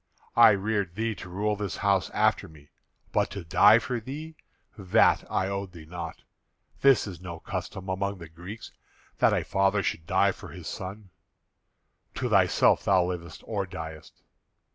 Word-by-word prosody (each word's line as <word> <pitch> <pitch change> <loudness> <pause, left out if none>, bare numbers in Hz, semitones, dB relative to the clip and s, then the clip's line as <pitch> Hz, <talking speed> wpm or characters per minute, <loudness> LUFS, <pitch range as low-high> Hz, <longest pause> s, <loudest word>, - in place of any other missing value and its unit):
I 120 - +9
reared 100 -3 0
thee 110 +1 -1
to 95 - -10
rule 105 +4 -1
this 105 -2 -4
house 100 -2 +1
after - - +1
me; 75 -2 -18 0.4
but - - +1
to 100 -3 -7
die 95 +6 +6
for 120 +1 -2
thee, 150 +7 -8 0.4
that 95 -3 +3
I 95 - +1
owed 100 -1 -4
thee 80 -3 -11
not. 85 0 -7 0.6
This 135 -2 +5
is 90 -5 -8
no 85 -2 -7
custom 95 +2 -6
among 100 +1 -2
the 85 -2 -10
Greeks 90 +7 -10 0.5
that - - +5
a - - +1
father 100 +1 +1
should 80 -2 -3
die - - +3
for - - -11
his - - -9
son. 95 +1 -7 1.0
To - - -2
thyself - - +4
thou 90 -1 +4
livest 85 -3 -6
or 100 -4 -2
diest. 80 -3 -9
95 Hz, 165 wpm, -27 LUFS, 85-105 Hz, 1.0 s, I